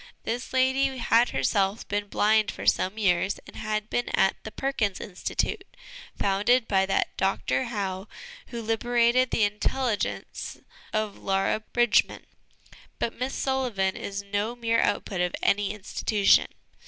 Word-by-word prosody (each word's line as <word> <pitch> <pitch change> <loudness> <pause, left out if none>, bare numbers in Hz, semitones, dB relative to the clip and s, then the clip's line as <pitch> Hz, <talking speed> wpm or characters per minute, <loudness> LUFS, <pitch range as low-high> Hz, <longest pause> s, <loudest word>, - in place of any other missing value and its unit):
This 240 +2 -3
lady 260 +1 +2
had 235 0 +3
herself 195 - 0
been 205 0 -2
blind 215 +1 +3
for - - -6
some 190 +4 +2
years, 190 -2 +1
and - - -13
had 215 0 -2
been 245 - -1
at 190 - +3
the 220 - -7
Perkins 225 -8 -1
Institute, 300 - -3 0.5
founded 210 +5 +2
by 190 -1 +2
that 195 - 0
Dr 195 +6 0
Howe 195 -4 -3 0.4
who 235 -1 -6
liberated 235 +3 +2
the 220 - +1
intelligence 210 +3 -2 0.3
of 215 -2 -2
Laura 195 +2 +1
Bridgman. 240 +1 +1 0.7
But 230 - -1
Miss 255 +2 -2
Sullivan 245 -8 0
is 200 0 -5
no 205 +4 -2
mere 230 -1 +1
output 190 -4 -1
of 180 0 0
any 205 0 +2
institution. 210 0 +2
215 Hz, 135 wpm, -26 LUFS, 195-240 Hz, 0.7 s, had